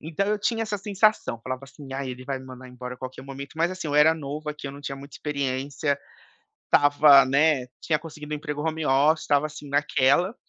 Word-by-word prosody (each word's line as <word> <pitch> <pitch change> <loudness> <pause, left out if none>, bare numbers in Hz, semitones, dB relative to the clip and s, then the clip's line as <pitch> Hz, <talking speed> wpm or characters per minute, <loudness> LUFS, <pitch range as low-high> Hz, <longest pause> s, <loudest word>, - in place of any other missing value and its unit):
Então 165 +6 -2
eu 210 0 +1
tinha 225 +2 0
essa 210 -2 -2
sensação, 200 - +1
falava 130 +1 -5
assim: 135 0 -12
"Ai, 135 -1 -3
ele 125 +1 -8
vai 135 -1 -3
me 130 - -12
mandar 130 0 -10
embora 125 0 -7
a - - -18
qualquer 130 0 -7
momento". 140 +2 -8
Mas 170 +2 +2
assim, 185 -4 -5
eu 145 - -2
era 155 +2 +6
novo 150 0 -6
aqui, 150 -1 -8
eu 135 - -5
não 140 - -10
tinha 135 -1 -5
muita 140 0 -11
experiência, 140 0 -2 0.7
estava, 145 -1 +6
né 140 -1 +2
tinha 155 -2 0
conseguido 150 -1 -9
1 - - 0
emprego 150 -1 -5
home 160 -1 -2
office, 145 +4 +3
estava, 145 +1 +2
assim, 150 -1 -10
naquela. 145 - +2
145 Hz, 220 wpm, -25 LUFS, 135-155 Hz, 0.7 s, era